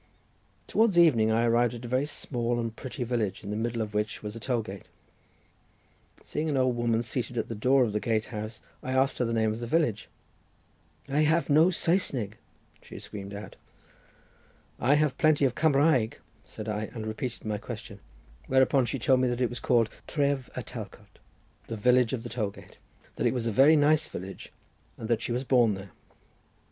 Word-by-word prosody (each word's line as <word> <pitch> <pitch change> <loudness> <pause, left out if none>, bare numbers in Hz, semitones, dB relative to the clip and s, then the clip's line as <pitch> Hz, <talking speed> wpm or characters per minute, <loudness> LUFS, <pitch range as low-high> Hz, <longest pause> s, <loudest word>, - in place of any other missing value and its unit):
Towards 220 -5 +2
evening 130 -11 +5
I 115 +1 +2
arrived 120 +1 +2
at 120 +1 -8
a - - -5
very 130 +4 0
small 120 -5 -2
and 115 -1 -3
pretty 130 0 -5
village, 115 -4 -2
in 100 - -5
the - - -2
middle 115 +1 -1
of 105 -1 -8
which 105 +1 -2
was 105 +1 -5
a - - -6
toll 120 -1 -1
gate—seeing 105 - -10
an 145 - 0
old 130 -2 +2
woman 120 -1 +1
seated 120 0 -4
at 115 - -2
the - - -3
door 130 +5 +3
of 110 -4 -1
the 105 - 0
gate 110 -1 0
house, 110 +1 -6 0.2
I 130 - -3
asked 135 +1 +2
her 125 - +2
the 115 - -2
name 110 -1 +1
of 110 - -6
the 120 - -5
village. 120 -7 0 1.0
"I 140 +2 0
have 155 +1 +2
no 155 +4 +6
Saesneg!" 140 - 0 0.4
she - - -11
screamed 100 0 -8
out. 105 - -9 1.2
"I 135 +4 +4
have 150 -3 +1
plenty 155 -3 +4
of 130 - +1
Cumraeg," 145 -6 +3 0.3
said 110 - -9
I, 105 0 -2
and 110 -2 -5
repeated 110 +3 -5
my 105 -1 -2
question. 110 -2 -8 0.5
Whereupon 130 -1 +3
she 135 - -2
told 130 +1 +3
me 130 - +2
that 120 0 -1
it 125 -2 +1
was 120 - -5
called 115 -3 +3 0.2
Tref 140 -3 0
y - - -3
Talcot—the 115 - -11
village 125 +2 +3
of 120 -3 -3
the 120 - -6
toll 110 -4 -2
gate. - - -15 0.4
That - - +1
it - - 0
was 120 -2 -2
a 115 - 0
very 135 +9 +6
nice 155 +1 +3
village, 95 +2 -8 0.5
and 110 - -6
that 115 -1 +1
she 120 - -3
was 125 +2 -1
born 120 -5 +3
there. 95 -1 -10
120 Hz, 195 wpm, -28 LUFS, 110-135 Hz, 1.2 s, no